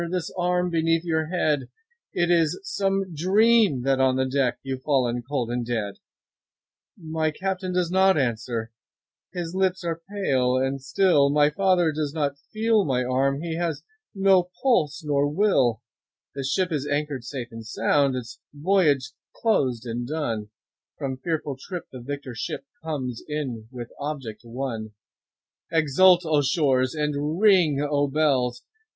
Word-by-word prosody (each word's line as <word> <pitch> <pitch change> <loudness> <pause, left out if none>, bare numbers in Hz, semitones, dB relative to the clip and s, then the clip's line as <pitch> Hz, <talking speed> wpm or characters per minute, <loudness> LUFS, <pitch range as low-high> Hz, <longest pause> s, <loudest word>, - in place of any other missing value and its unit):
This 180 -2 -3
arm 180 0 0
beneath 165 0 +1
your 160 -2 0
head! 155 -6 0 0.4
It 175 0 +1
is 165 -2 +2
some 195 - -1
dream 195 - +3
that 135 0 +2
on 130 -1 +3
the 130 0 +1
deck 130 -2 +1
15 - - -46
You've 135 -1 -4
fallen 125 -4 +1
cold 125 -2 -3
and 120 0 -1
dead. 110 -4 -3 1.0
My 160 -1 -1
Captain 185 +3 -3
does 180 -1 0
not 190 0 +4
answer, 115 -3 -2 0.6
his 175 -2 -5
lips 190 0 0
are 165 -1 -3
pale 130 -11 +1
and 135 +1 -1
still, 145 -1 +3
My 145 +1 +3
father 180 -1 +2
does 150 0 -3
not 140 -2 -1
feel 220 -1 +2
my 130 -6 0
arm, 135 +3 0
he 165 -1 -3
has 170 -4 -2 0.3
no 190 -2 +4
pulse 165 - +2
nor 145 -1 +1
will; 145 - +2 0.5
The 140 - -4
ship 175 +7 0
is 145 -2 -2
anchor'd 145 -3 -2
safe 120 -2 -6
and 115 0 -8
sound, 135 +5 +1
its 120 -3 -7 0.2
voyage 145 -5 +2 0.2
closed 130 - +1
and 120 +1 -4
done, 120 -9 -3 0.5
From 135 -3 -3
fearful 145 -1 -3
trip 180 +2 -6
the 130 - -9
victor 140 0 -6
ship 115 - -5 0.2
comes 130 -7 -4
in 130 -7 -4
with 120 -2 -8
object 140 -7 -5
won; 115 -3 -5 0.8
20 165 -1 +2
Exult, 175 +5 +5
O 155 -2 +3
shores! 135 -2 +1
and 150 +2 -1
ring, 170 -9 +4
O 145 -1 +1
bells! 135 -4 +1
145 Hz, 155 wpm, -25 LUFS, 130-175 Hz, 1.0 s, Exult